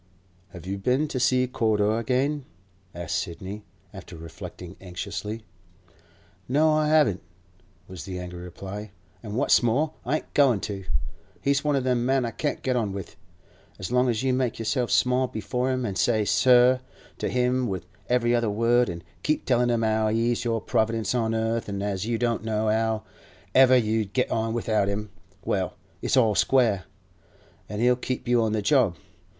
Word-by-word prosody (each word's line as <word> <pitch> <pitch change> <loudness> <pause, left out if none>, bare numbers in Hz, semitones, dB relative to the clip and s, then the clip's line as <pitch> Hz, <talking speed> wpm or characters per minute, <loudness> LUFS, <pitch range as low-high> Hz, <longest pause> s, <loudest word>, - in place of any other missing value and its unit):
'Have 90 -3 -11
you 95 +1 -3
been 130 +9 +1
to 130 - -2
see 125 0 +3
Corder 110 -3 +1
again?' 135 +4 0 0.5
asked 85 -2 -2
Sidney, 95 +5 -6 0.3
after - - -10
reflecting 85 +2 -9
anxiously. 100 +4 -5 1.1
'No, 155 +4 +4
I 155 0 +2
haven't!' 150 - +3 0.7
was 90 -6 -8
the 95 -1 -5
angry 90 -1 -7
reply; 95 +4 -7 0.3
'an' 105 -2 -6
what's 130 - +4
more, 135 +7 +1
I 135 +5 0
ain't - - -5
goin' 135 -7 +4
to! 100 -3 -5 0.5
He's 140 0 +1
one 150 -1 +1
o' 135 - +1
them 125 -2 +1
men 130 0 +2
I 115 - -3
can't 145 +4 -3
get 130 -1 0
on 110 -5 -1
with. 95 -2 -7 0.6
As 95 +2 -6
long 125 0 +3
as 115 0 -1
you 130 -1 +2
make 125 -2 0
yourself 115 +2 -1
small 125 +1 +3
before 125 +3 -2
him, 130 -1 -1
an' 100 -4 -3
say 105 +2 +2
"sir" 125 +4 +5 0.4
to - - -1
him 125 0 +1
with 95 -4 -4 0.2
every 120 -1 +2
other 120 -2 +2
word, 115 +3 +2
an' 85 0 -6 0.2
keep 155 - 0
tellin' 125 -1 +2
him 115 -1 +1
as 110 0 +1
he's 120 +1 +1
your 115 -2 0
Providence 110 +1 0
on 115 -2 0
earth, 115 0 -1
an' 100 0 -3
as 100 0 -2
you 115 -1 0
don't 115 -1 0
know 110 -1 0
how 110 0 0 0.5
ever 130 -1 +7
you'd 110 -3 0
get 125 - 0
on 115 0 0
without 110 -3 +1
him—well, 95 -2 -4 0.3
it's - - +1
all 115 -4 +4
square, 110 -5 +2 0.8
an' 105 +1 -4
he'll 125 +1 +4
keep 125 0 -4
you 120 -1 +3
on 110 -1 0
the 105 -2 -1
job. 110 - +3
115 Hz, 175 wpm, -25 LUFS, 105-125 Hz, 1.1 s, ever